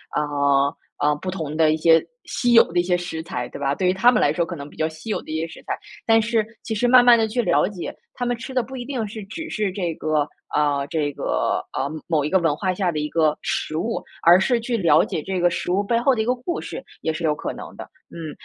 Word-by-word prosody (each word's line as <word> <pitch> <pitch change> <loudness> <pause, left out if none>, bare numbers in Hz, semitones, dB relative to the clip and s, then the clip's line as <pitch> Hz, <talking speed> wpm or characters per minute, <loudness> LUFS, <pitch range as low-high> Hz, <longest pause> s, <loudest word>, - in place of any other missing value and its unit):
呃， 140 -1 +1 0.2
呃， 150 0 +2
不 185 - -5
同 160 -5 -4
的 155 -1 +4
一 155 - +1
些 165 0 +5 0.2
稀 245 -1 0
有 230 - +9
的 175 - +2
一 - - +3
些 180 0 +1
食 175 -2 -5
材， 125 -6 -4
对 - - -9
吧。 140 0 +1
对 185 +2 0
于 185 - +3
他 235 +6 +5
们 230 - +2
来 145 - +3
说 170 - +1
可 170 +1 -5
能 140 -2 -8
比 - - -16
较 155 - 0
稀 160 +8 -7
有 - - -1
的 - - -15
一 160 - -1
些 165 - -2
食 160 - -13
材， - - -2 0.3
但 225 0 +6
是 225 0 +1 0.2
其 220 - -3
实 245 +3 +1
慢 250 0 +7
慢 240 -1 +8
地 225 -1 +2
去 230 +3 -3
了 180 - +3
解， 190 -3 -6 0.2
他 245 - -3
们 245 0 0
吃 260 +3 -8
的 250 - +2
不 265 - -9
一 250 - -5
定 245 -4 -3
是 210 0 -7
只 320 +11 -7
是 210 -3 -1
这 180 -3 -2
个 155 -2 0 0.2
啊， 145 -2 +1
这 150 -2 -1
个， - - -1
呃， 135 - 0 0.2
某 155 -4 +1
一 - - -1
个 190 - +3
文 165 -4 +1
化 185 +4 -1
下 180 -1 0
的 155 - -4
一 150 - -1
个 155 -2 +2
食 155 - -2
物， 225 +8 -2 0.2
而 175 +2 +7
是 240 +5 +2
去 235 +1 -2
了 165 -5 +4
解 - - -3
这 190 +3 -3
个 175 0 +4
食 175 - -2
物 195 +3 +2
背 230 +3 +1
后 265 +1 +3
的 220 - 0
一 - - -1
个 245 - +2
故 255 +8 -4
事 - - -7 0.2
也 160 - -1
是 170 - -5
有 150 -2 +2
可 - - -4
能 - - -10
的。 - - -6 0.3
嗯， 160 -2 -7
175 Hz, 305 characters per minute, -22 LUFS, 155-225 Hz, 0.3 s, 有